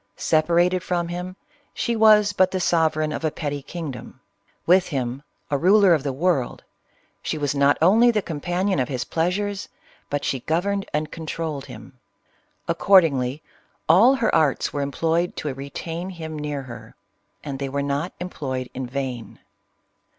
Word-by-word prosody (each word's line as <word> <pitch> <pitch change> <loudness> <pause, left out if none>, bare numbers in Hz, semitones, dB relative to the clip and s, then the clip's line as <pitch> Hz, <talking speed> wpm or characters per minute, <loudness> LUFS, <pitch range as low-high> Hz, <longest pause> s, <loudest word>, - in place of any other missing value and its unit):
Separated 175 +3 +2
from 175 -1 -2
him 180 +1 -5 0.4
she 235 - -1
was 215 -2 +5
but 185 -1 +3
the 185 - -2
sovereign 160 -3 +1
of 155 - -4
a 155 - +2
petty 145 -2 -4
king 160 +1 -6
dom; 130 0 -11 0.5
with 180 +2 +4
him 130 -3 -3 0.2
— - - -33
a 140 - +1
ruler 195 +2 +5
of 155 - +2
the 140 0 -2
world 140 -2 -1 0.3
— - - -40
she - - -3
was 145 -2 -1
not 140 0 +3
only 225 +8 +6
the 215 -4 +1
companion 175 +4 -1
of 125 - 0
his 125 -3 -2
pleasures, 190 +7 -2 0.4
but 145 0 -2
she 135 - -1
governed 195 +8 -1
and 150 0 -2
controlled 160 -3 -5
him. 115 +4 -12 0.7
Accordingly, 150 -7 +3 0.4
all 215 +12 +6
her 230 -4 0
arts 150 -4 +2
were 145 - -2
employed 165 +5 0
to 145 -3 -3
retain 165 +6 -6
him 160 -4 -7
near 145 -2 -4
her, 115 -3 -11 0.2
— 100 0 -46
and 135 -2 -5
they 140 -1 -3
were 140 +1 -2
not 140 +5 -2
employed 130 -8 -5
in 130 -1 -4
vain. 130 -2 -5
155 Hz, 165 wpm, -23 LUFS, 140-180 Hz, 0.7 s, only